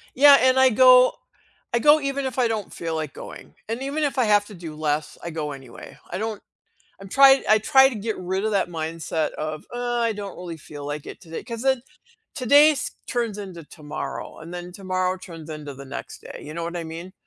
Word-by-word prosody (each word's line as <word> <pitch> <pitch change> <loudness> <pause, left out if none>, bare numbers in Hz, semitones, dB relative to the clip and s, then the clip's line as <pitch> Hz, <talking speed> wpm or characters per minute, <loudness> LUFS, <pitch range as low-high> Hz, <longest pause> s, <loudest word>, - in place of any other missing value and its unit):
Yeah, 285 +1 +9
and 260 0 +4
I 260 0 +6
go 255 +2 +7 0.6
I 235 - +3
go 300 +5 +6
even 275 0 -2
if 260 -1 -4
I 250 -2 +3
don't 220 -3 -3
feel 165 -1 -4
like 155 -3 -4
going, - - -10 0.2
and 230 +3 -3
even 280 +3 -2
if 285 -2 -1
I 255 - +3
have 205 -1 +4
to 215 - -11
do 170 -4 -8
less, 150 0 -2
I 170 - -4
go 155 -2 -4
anyway, 135 -4 -11
I - - -3
don't 215 0 -4 0.6
I'm 195 - -10
try 270 +3 +7
I 215 0 +6
try 265 +5 +6
to 255 - -7
get 215 +1 -3
rid 190 +3 -2
of 220 - 0
that 195 -3 +1
mindset 160 -1 -3
of, 155 0 -5
"uh, 245 0 -1
I 230 -1 +1
don't 200 -2 -7
really 175 -2 -7
feel 145 -1 -10
like 145 0 -5
it - - -9
today" 165 -3 -7
'cause 230 -2 -6
then 265 -2 +2 0.5
today's 290 +3 +4 0.2
turns 230 -4 -2
into 185 -5 -8
tomorrow, 150 -2 -7
and 165 +2 -10
then 175 0 -7
tomorrow 185 0 -2
turns 165 -4 -11
into 150 -2 -7
the 140 +1 -11
next 135 - -8
day, - - -9
you 150 - -8
know 170 +1 -4
what 170 +1 -4
I 170 - -4
mean? 165 +3 -8
190 Hz, 220 wpm, -24 LUFS, 160-245 Hz, 0.6 s, Yeah